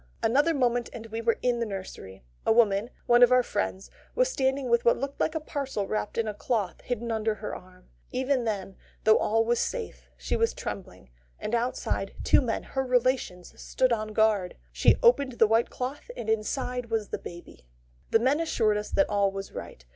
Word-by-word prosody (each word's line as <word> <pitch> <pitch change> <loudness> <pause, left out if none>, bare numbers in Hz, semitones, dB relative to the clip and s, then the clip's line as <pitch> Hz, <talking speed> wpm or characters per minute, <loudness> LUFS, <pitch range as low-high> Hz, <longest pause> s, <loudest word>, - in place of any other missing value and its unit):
Another 290 +8 +3
moment, 245 -3 +1
and 225 -2 -8
we 225 0 -5
were 230 0 +1
in 245 -1 +1
the 235 - 0
nursery. 185 - -8 0.2
A - - +2
woman 220 -1 +3 0.2
one 240 0 +5
of 245 0 +7
our 250 0 +5
friends 200 -3 -3 0.2
was - - +2
standing 265 - 0
with 235 0 +3
what 235 - +4
looked 275 +1 -5
like 315 - 0
a - - +1
parcel 275 -9 -3
wrapped 215 0 -3
in 230 -1 0
a 210 - -2
cloth 205 -3 -2
hidden 235 -1 -3
under 220 -1 0
her 210 - -6
arm. 185 0 -14 0.2
Even 260 0 0
then, 195 -4 -3 0.3
though 220 0 +5
all 225 +1 +2
was 235 +1 +1
safe, 475 -3 -4
she - - -2
was 460 0 +1
trembling; 65 - -7 0.3
and 215 - -5
outside, 240 +2 -1
two - - +5
men, 235 -4 -2
her 265 - -2
relations, 250 -8 0
stood 255 -2 +1
on 215 -1 -2
guard. 215 -4 +1 0.2
She - - +4
opened 280 - +4
the 230 - +4
white 225 +2 +2
cloth, 265 - -5
and 220 - -6
inside 245 +3 -2
was 225 -2 -1
the - - -4
baby. 170 - -11 0.4
The - - +5
men 260 +6 +2
assured 225 -10 +1
us 210 - -4
that 290 - +2
all 200 -1 +1
was 195 0 -6
right. 65 - -9
230 Hz, 200 wpm, -27 LUFS, 210-255 Hz, 0.4 s, of